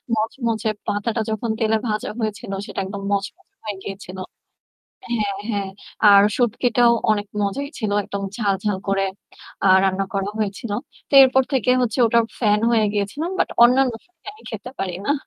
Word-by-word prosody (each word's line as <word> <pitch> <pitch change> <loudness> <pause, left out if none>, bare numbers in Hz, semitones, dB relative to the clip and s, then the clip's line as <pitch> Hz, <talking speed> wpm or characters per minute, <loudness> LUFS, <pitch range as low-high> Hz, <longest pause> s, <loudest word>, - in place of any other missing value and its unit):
মচমচে 225 0 -1 0.2
পাতাটা 225 +3 -1
যখন 220 +1 -2
তেলে 220 0 +2
ভাজা 210 0 -2
হয়েছিল 215 -1 -4
সেটা 205 - -6
একদম 200 +1 -6
মচমচে 205 - -4
হয়ে 210 -2 -5
গিয়েছিল 195 -1 -8 1.0
হ্যাঁ, 205 -3 -1
হ্যাঁ। 200 -3 -2 0.4
আর 200 0 +8
শুটকিটাও 240 0 +3 0.2
অনেক 205 -1 +1 0.2
মজাই 275 +8 -2
ছিল। 215 -4 -2
একদম 200 +1 -5
ঝাল, 205 -4 +1
ঝাল 205 -3 0
করে 195 0 +1 0.6
আ - - +6 0.2
রান্না 195 0 +1
করা 195 +1 -1
হয়েছিলো। 205 +1 -3 0.3
তো - - -27
এরপর 265 0 +5
থেকে 250 -2 +2
হচ্ছে 235 0 -1
ওটার 230 +1 +3 0.2
ফ্যান 210 -2 +3
হয়ে 225 -2 +3
গিয়েছিলাম। 215 - -2
বাট - - +2 0.2
অন্যান্য 255 +1 +4
শুটকি 360 0 -34
আমি 430 - -19
খেতে 225 +3 -7
পারি 185 -2 -3
না। 285 - +3
215 Hz, 160 wpm, -21 LUFS, 200-240 Hz, 1.0 s, আর